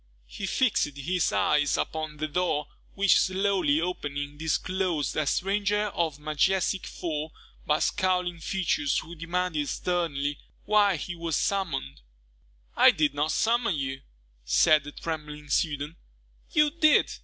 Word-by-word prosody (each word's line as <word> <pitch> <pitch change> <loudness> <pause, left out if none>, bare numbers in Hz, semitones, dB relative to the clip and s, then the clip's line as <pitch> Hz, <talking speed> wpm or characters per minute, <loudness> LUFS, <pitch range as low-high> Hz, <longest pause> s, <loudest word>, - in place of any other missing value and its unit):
He 195 - -6
fixed 190 - +1
his 175 +5 0
eyes 145 -2 +2
upon 155 -1 -3
the 155 +1 -2
door, 155 -2 0 0.3
which, 200 -1 +4
slowly 185 -5 +1
opening, 145 -4 -3
disclosed 160 -2 -1
a 155 -2 0
stranger 205 +4 +1
of 160 -4 -1
majestic 175 +6 0
form, 155 -2 -4 0.4
but 150 - +2
scowling 180 -3 0
features, 160 -5 0
who 170 - -5
demanded 165 -3 -2
sternly, 145 -6 -1 0.3
why 205 -2 +4
he 170 +3 -5
was 165 -2 -2
summoned? 165 - -2 0.7
"I - - +7
did 150 -2 +2
not 145 +2 0
summon 230 -4 +1
you," 135 -1 -3 0.4
said 150 - +4
the 145 - -7
trembling 150 -2 -6
student. 150 0 0 0.6
"You 300 -1 +3
did!" 310 -2 +4
160 Hz, 130 wpm, -27 LUFS, 150-185 Hz, 0.7 s, I